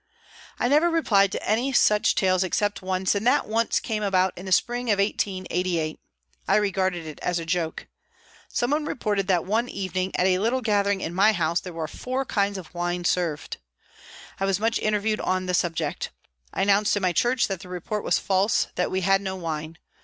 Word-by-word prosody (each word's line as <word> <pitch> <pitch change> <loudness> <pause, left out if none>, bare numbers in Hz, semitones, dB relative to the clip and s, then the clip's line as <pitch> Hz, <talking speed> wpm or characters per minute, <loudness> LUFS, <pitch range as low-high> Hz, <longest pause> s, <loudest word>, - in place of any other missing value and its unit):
I - - +1
never 300 +6 +4
replied 205 - +3
to - - -5
any 235 +6 +1
such 210 -4 +4
tales 185 -1 +2
except 205 +3 -1
once, 185 0 0
and 205 +3 -1
that - - +3
once 225 +2 +1
came 220 -3 -3
about 190 -2 +1
in 185 +2 -9
the - - -5
spring 240 +5 +1
of 205 - +3
1888. 185 -5 -1 0.5
I - - +4
regarded 190 -4 0
it 155 -1 -8
as 180 -1 0
a 165 - -4
joke. 165 -1 -2 0.6
Some 240 +2 -1
one 300 +1 +1
reported 205 -8 -1
that 180 -4 +2
one 225 +5 0
evening, 185 0 -3
at 180 - +2
a 185 -1 +3
little 235 +5 +1
gathering 200 -3 +1
in 165 - -4
my 200 +4 +4
house, 170 -2 +1
there 180 - -8
were 165 -2 -4
four 255 +10 -3
kinds 200 -4 0
of 185 -2 -10
wine 175 0 -2
served. 165 -5 -1 0.8
I 195 - 0
was 195 0 +1
much 225 +2 +1
interviewed 215 0 0
on 185 0 0
the 180 - -2
subject. 175 -2 -1 0.4
I - - -1
announced 200 +1 +3
in 200 - -3
my 180 -1 +2
church 240 +6 +2
that 195 -3 -3
the 185 -1 -12
report 180 +4 -4
was - - +2
false, 195 +2 +1
that 180 - -1
we 190 - -1
had 195 +1 +3
no 190 -1 -3
wine. 160 -2 -5
195 Hz, 200 wpm, -25 LUFS, 180-215 Hz, 0.8 s, never